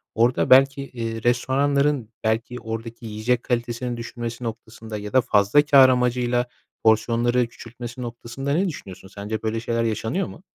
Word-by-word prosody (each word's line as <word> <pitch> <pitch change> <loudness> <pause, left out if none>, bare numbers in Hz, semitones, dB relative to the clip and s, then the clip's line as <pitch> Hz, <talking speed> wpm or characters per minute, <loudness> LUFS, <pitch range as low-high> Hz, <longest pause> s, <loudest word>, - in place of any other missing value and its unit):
orada 120 +3 +2
belki, 135 +1 +6
eee, 115 -4 -5
restoranların, 135 +1 +1
belki, 115 +2 -1
oradaki 115 +1 -7
yiyecek 115 +3 -1
kalitesini 120 0 -2
düşmesi 120 0 -6
noktasında 115 -1 -7
ya 105 0 -7
da 130 - +6
fazla 105 +2 +4
kâr 135 -2 +7
amacıyla 125 -1 +1 0.4
porsiyonları 115 +2 +2
küçültmesi 120 +1 -9
noktasında 120 +3 -4
ne 185 +6 +2
düşünüyorsun? 95 - -9
Sence 105 +2 -5
böyle 110 0 -1
şeyler 115 0 -1
yaşanıyor 115 - -1
mu? 180 - -12
120 Hz, 140 wpm, -23 LUFS, 115-125 Hz, 0.4 s, kâr